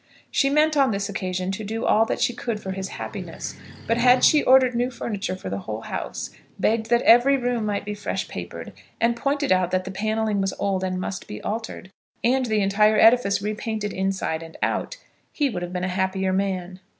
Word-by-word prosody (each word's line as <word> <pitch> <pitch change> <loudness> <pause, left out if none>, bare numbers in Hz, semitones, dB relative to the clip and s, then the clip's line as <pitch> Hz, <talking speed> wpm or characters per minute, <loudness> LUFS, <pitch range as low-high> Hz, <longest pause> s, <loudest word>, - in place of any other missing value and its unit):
She 275 - +2
meant 305 +2 +3
on 275 -2 +4
this 200 -1 -2
occasion 185 -1 -2
to 210 +3 -5
do 225 +2 -3
all 220 +1 +4
that - - -2
she 245 - +1
could 235 -2 -3
for 190 - -5
his 190 0 -4
happiness, - - -6 0.3
but 230 - +1
had 250 +1 +5
she 300 - +6
ordered 260 -1 +5
new 245 +1 0
furniture 210 -6 -4
for 185 - -9
the 100 - -2
whole 110 +2 -5
house, - - -5 0.3
begged 220 0 0
that 240 0 +3
every 245 +4 +6
room 245 -3 -1
might 205 -1 -2
be 210 - -3
fresh 205 - -3
papered, - - -7 0.3
and 235 +1 +2
pointed 280 +1 -1
out 185 -1 +3
that 185 0 0
the 190 - -6
panelling 215 +1 -1
was 195 -1 -1
old 195 -2 -1
and 185 -1 -2
must 190 +1 -5
be 105 - -7
altered, 220 -3 -5 0.3
and 255 +2 +2
the 215 -2 +1
entire 210 +2 +3
edifice 225 -4 +4
re 210 +1 -1
painted 215 -1 -4
inside 190 -4 -1
and 165 0 -11
out, - - -1 0.3
he 285 -3 0
would 180 -5 -4
have 175 0 -5
been 180 0 -3
a - - 0
happier 190 +1 0
man. 185 -1 -2
210 Hz, 210 wpm, -24 LUFS, 190-235 Hz, 0.3 s, she